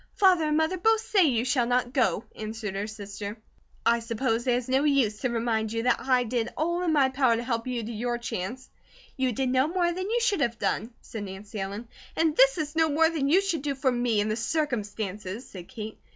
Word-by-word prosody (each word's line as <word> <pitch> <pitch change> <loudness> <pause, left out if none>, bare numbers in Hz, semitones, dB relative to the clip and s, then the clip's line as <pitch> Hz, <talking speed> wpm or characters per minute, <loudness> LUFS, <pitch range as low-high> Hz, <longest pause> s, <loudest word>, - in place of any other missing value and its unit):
"Father 370 -5 +4
and 305 0 +1
Mother 320 +3 +1
both 445 +4 +4
say 390 -6 +3
you 240 -5 +1
shall 255 -2 +1
not 245 0 0
go," 255 -4 +2
answered 215 -1 -5
her 200 +2 -3
sister. 205 0 -7 0.5
"I 235 0 +4
suppose 230 0 -1
there 245 -2 +3
is 245 - -4
no 265 +2 +2
use 265 -8 +2
to 255 - 0
remind 225 -2 -1
you 230 0 -2
that 245 -1 +2
I 255 -2 +2
did 235 0 -2
all 345 +3 0
in 350 -2 +1
my 280 -4 +4
power 260 -3 +3
to 230 - -3
help 230 -1 -2
you 245 -2 -2
to 225 - -5
your 240 +2 -2
chance." 235 +1 -5 0.5
"You 260 -2 +1
did 260 +3 -1
no 260 +2 +3
more 345 +1 +1
than 370 +3 -4
you 475 +2 +2
should 435 -8 +1
have 235 -3 0
done," 225 - -1
said 215 -2 -7
Nancy 200 +2 -8
Ellen. 200 +4 -5 0.3
"And 320 -2 +2
this 270 +1 +5
is 305 -1 -3
no 320 0 +3
more 320 +2 +3
than 285 -4 0
you 365 +6 +5
should 345 -7 -1
do 280 -1 -2
for 265 -1 +1
me, 240 -3 +1
in 205 - +1
the 215 - 0
circumstances," 220 - -3
said 180 -3 -10
Kate. 215 -1 -8
245 Hz, 230 wpm, -27 LUFS, 220-300 Hz, 0.5 s, this